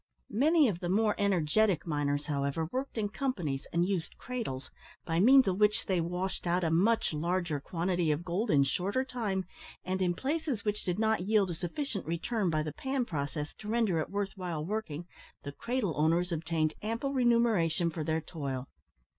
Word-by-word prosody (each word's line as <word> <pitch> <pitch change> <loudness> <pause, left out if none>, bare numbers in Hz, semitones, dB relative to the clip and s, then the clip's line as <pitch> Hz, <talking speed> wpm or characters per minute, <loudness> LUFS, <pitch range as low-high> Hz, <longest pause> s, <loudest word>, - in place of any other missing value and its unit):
Many 300 +6 +4
of 185 -6 -1
the 175 - -3
more 210 +2 +3
energetic 195 0 +2
miners, 145 -2 0
however, 140 +2 -1
worked 260 -1 -3
in 210 -2 +1
companies 180 - -2
and 170 +1 +2
used 185 -4 -2
cradles, 220 - -5 0.3
by 165 0 0
means 260 +5 +7
of 190 0 0
which 210 0 +3
they 185 -3 +1
washed 180 +2 -3
out 175 +1 +2
a 165 - +1
much 200 +4 +3
larger 170 0 -1
quantity 175 +2 -1
of 155 +3 0
gold 190 +6 -1
in 140 -2 +5
shorter 200 - 0
time; 210 -7 -2 0.4
and 185 +1 -1
in 175 -1 +2
places 280 - -2
which 210 0 -1
did 180 -1 -1
not 220 -4 +1
yield 205 -4 +3
a - - -2
sufficient 195 - -4
return 185 +4 0
by 155 -1 +1
the 155 -1 -4
pan 265 - -1
process 145 - -3
to 210 - -9
render 215 -6 +2
it 155 - -2
worth 200 -1 -2
while 175 -5 -3
working, 175 -5 -3 0.4
the 140 - -5
cradle 230 - -2
owners 165 +4 +2
obtained 160 -1 0
ample 230 +6 -2
remuneration 225 - +3
for 160 -1 -4
their 160 +1 0
toil. 140 -5 -5
180 Hz, 180 wpm, -31 LUFS, 160-220 Hz, 0.4 s, means